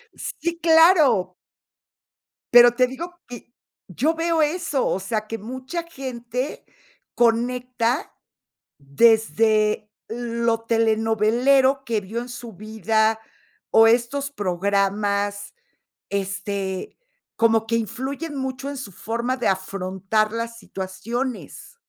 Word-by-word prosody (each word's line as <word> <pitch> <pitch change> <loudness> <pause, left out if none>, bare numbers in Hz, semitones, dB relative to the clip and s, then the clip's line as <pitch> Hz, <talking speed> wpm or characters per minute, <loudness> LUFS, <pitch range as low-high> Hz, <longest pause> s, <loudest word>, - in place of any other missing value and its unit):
¡Sí, 340 0 -4
claro! 320 - +5 1.2
Pero 240 0 +9
te 255 0 +4
digo 340 +8 -7
que 240 -1 -11 0.4
yo 265 - 0
veo 330 -1 +1
eso, 300 -4 -1
o 190 - 0
sea, 215 +2 -3
que 225 +1 -6
mucha 260 - -5
gente 255 -2 -5 0.5
conecta 245 +2 0 0.7
desde 215 +6 +2 0.2
lo 235 -1 -1
telenovelero 230 +4 +2
que 230 -4 -1
vio 210 +4 -5
en 245 - -7
su 240 -1 -8
vida, 220 +2 0 0.5
o 225 0 +6
estos 250 +5 +1
programas, 200 - -1 0.6
este, 195 - -3 0.4
como 225 -1 +3
que 230 - +1
influyen 265 - -4
mucho 265 +1 -4
en 285 - -5
su 265 -6 -7
forma 235 +7 -3
de 245 - -3
afrontar 190 +2 -1
las 230 0 -4
situaciones. 230 - -5
230 Hz, 105 wpm, -23 LUFS, 210-260 Hz, 1.2 s, Pero